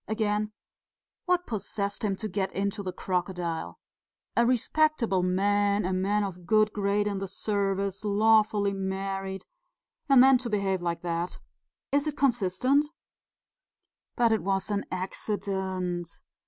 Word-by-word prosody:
Again, 215 -1 0 0.8
what 355 0 +2
possessed 200 -1 -3
him 200 -2 +1
to 215 - -4
get 195 -1 -2
into 200 +2 -2
the 185 -2 -4
crocodile? 180 -3 -3 0.6
A 235 0 +4
respectable 250 -4 +2
man, 200 +2 +2
a 185 - 0
man 200 +3 +1
of 180 -3 -6
good 215 -1 +3
grade 205 0 +1
in 200 -2 -1
the 195 - -4
service, 195 0 -1
lawfully 210 -1 +3
married 195 0 -3 0.6
and 265 -2 +8
then 265 -1 +6
to 245 -1 -4
behave 195 -3 0
like 170 -1 -2
that! 170 0 -3 0.5
Is 285 +2 +2
it 295 -1 -3
consistent?" 255 +2 +2 1.3
"But 235 -2 +3
it 220 - +2
was 195 +1 -1
an 200 -1 -1
accident." 185 -2 -3
200 Hz, 130 wpm, -28 LUFS, 190-220 Hz, 1.3 s, and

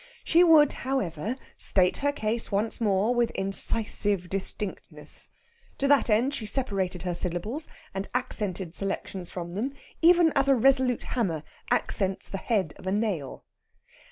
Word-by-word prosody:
She 340 +2 +4
would, 315 -4 +6
however, 220 - -3 0.2
state 185 -1 +3
her 285 0 0
case 225 -4 -3
once 210 +4 -1
more 205 +2 +1
with 240 -1 +1
incisive 195 -1 +4
distinctness. 195 +1 -2 0.5
To 275 - 0
that 285 -3 +3
end 235 +6 +2
she 220 -7 -5
separated 195 -7 -2
her 180 -1 -2
syllables, 180 - -2 0.3
and 195 +1 -4
accented 195 -8 -2
selections 190 -2 -4
from 175 -1 -7
them, 245 +8 -3 0.3
even 340 -1 +5
as 275 0 +2
a 275 - +5
resolute 260 0 +3
hammer 175 - -2 0.3
accents 195 -1 -1
the 195 - -4
head 195 -10 -1
of 185 - -11
a - - 0
nail. 200 -10 -3
210 Hz, 145 wpm, -26 LUFS, 190-260 Hz, 0.5 s, would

